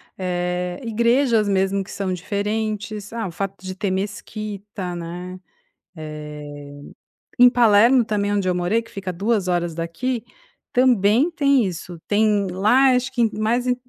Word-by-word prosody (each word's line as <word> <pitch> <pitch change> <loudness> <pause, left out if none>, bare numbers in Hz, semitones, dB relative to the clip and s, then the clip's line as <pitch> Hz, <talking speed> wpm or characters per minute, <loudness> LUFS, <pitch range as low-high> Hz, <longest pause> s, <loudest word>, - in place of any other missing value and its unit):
eh, 180 -1 -2
igrejas 235 0 +2
mesmo 195 0 +1
que 190 - -16
são 190 -2 -2
diferentes. 210 +2 -3
Ah, 230 -1 -3
o 175 - -6
fato 195 +3 -4
de 185 - -4
ter 195 +1 -2
mesquita, 200 -1 -5
né? 175 +2 -7 2.0
Eh, 245 - +8
em - - +10
Palermo 240 +1 +5
também 205 -2 -1
onde 200 -2 0
eu 180 - +2
morei, 180 +6 +1
que 230 - -18
fica 195 -1 -7
a - - -3
2h 180 -4 0
daqui, 190 +10 -3 0.5
também 245 - +4
tem 280 -7 +3
isso, 175 -1 -6
tem 210 -1 +2
lá 215 +9 +4
acho 250 +1 0
que 240 -4 +1
mais 235 +3 +1
hum 250 - +3
205 Hz, 145 wpm, -22 LUFS, 185-230 Hz, 2.0 s, em